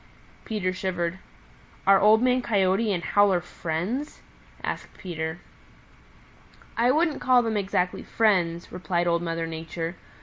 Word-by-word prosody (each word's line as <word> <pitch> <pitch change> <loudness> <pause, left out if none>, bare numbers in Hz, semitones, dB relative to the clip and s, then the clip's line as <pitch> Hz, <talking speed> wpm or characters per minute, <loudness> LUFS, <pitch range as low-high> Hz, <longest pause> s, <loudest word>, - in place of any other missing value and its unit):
Peter 205 -5 -1
shivered. 185 -1 -2 0.7
"Are 195 0 +6
Old 215 +3 +5
Man 255 0 +3
Coyote 205 -1 +1
and 175 -3 -1
Howler 205 -3 +3
friends?" 175 - -4 0.4
asked - - -5
Peter. 160 -2 -4 1.4
"I 235 +2 +3
wouldn't 310 +2 +2
call 250 -1 +4
them 225 -1 -1
exactly 190 -3 0
friends," 180 -6 +1
replied 175 -1 -1
Old 170 -1 +1
Mother 165 -1 -2
Nature. 165 +1 -5
185 Hz, 125 wpm, -26 LUFS, 170-220 Hz, 1.4 s, Are